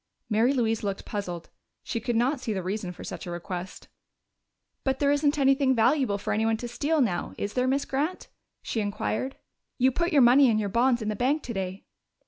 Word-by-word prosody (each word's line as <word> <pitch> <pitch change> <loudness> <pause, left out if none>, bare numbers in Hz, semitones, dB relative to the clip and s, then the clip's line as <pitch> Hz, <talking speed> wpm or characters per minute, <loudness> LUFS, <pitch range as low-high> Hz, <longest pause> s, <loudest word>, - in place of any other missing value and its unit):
Mary 225 +5 +3
Louise 225 -5 0
looked 200 -1 -3
puzzled; 175 -5 -5 0.3
she 230 - -3
could 235 +1 -2
not 255 +5 +2
see 230 -3 -3
the 190 -2 -3
reason 190 0 -3
for 180 - -10
such - - -7
a - - -4
request. 175 +1 -6 1.0
"But 265 -1 0
there 280 0 +2
isn't 290 +1 +2
anything 270 -1 +3
valuable 245 -2 +2
for 200 - -2
anybody 225 +1 +1
to 240 - -5
steal 290 +6 0
now, 185 -8 -1
is 205 - -3
there, 250 0 +1
Miss 275 +2 +1
Grant?" 300 +7 -2 0.4
she 225 - -2
inquired. 215 +5 -2 0.4
"You 260 +1 +4
put 340 +7 -1
your 280 -4 +6
money 255 +2 +7
and 215 -1 +2
your 205 -2 -1
bonds 240 +2 +2
in 215 - -2
the 215 - -1
bank 275 +7 +1
today." 195 -4 -5
235 Hz, 200 wpm, -27 LUFS, 205-270 Hz, 1.0 s, money